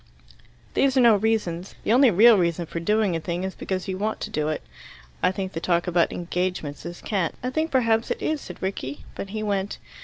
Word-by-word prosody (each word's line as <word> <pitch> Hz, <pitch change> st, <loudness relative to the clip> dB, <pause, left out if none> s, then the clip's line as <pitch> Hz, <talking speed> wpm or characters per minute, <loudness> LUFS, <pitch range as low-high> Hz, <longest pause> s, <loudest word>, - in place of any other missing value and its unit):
"These 275 Hz, -1 st, +2 dB
are -, -, +6 dB
no 235 Hz, -3 st, +7 dB
reasons. 200 Hz, -4 st, -1 dB
The 220 Hz, -, +2 dB
only 260 Hz, +1 st, +6 dB
real 220 Hz, +4 st, +7 dB
reason 170 Hz, -2 st, +1 dB
for 170 Hz, -, -5 dB
doing 210 Hz, +1 st, +1 dB
a -, -, 0 dB
thing 175 Hz, +2 st, -3 dB
is 190 Hz, 0 st, -3 dB
because 185 Hz, -1 st, -4 dB
you 190 Hz, -1 st, -3 dB
want 215 Hz, +2 st, -1 dB
to 215 Hz, -, -4 dB
do 155 Hz, -6 st, -1 dB
it. 155 Hz, -, -2 dB, 0.6 s
I -, -, +3 dB
think 190 Hz, 0 st, -4 dB
the 165 Hz, -, -3 dB
talk 170 Hz, 0 st, +1 dB
about 175 Hz, -2 st, +2 dB
'engagements' 175 Hz, -3 st, -3 dB
is 175 Hz, 0 st, -8 dB
cant." 190 Hz, -7 st, -1 dB
"I 255 Hz, -, -1 dB
think 315 Hz, +4 st, 0 dB
perhaps 230 Hz, -4 st, +2 dB
it -, -, -2 dB
is," 310 Hz, -2 st, -1 dB
said -, -, -10 dB
Rickie. 145 Hz, -8 st, -4 dB
But 195 Hz, -, -6 dB
he 215 Hz, +1 st, -4 dB
went. 200 Hz, -1 st, -1 dB
190 Hz, 220 wpm, -25 LUFS, 175-220 Hz, 0.6 s, no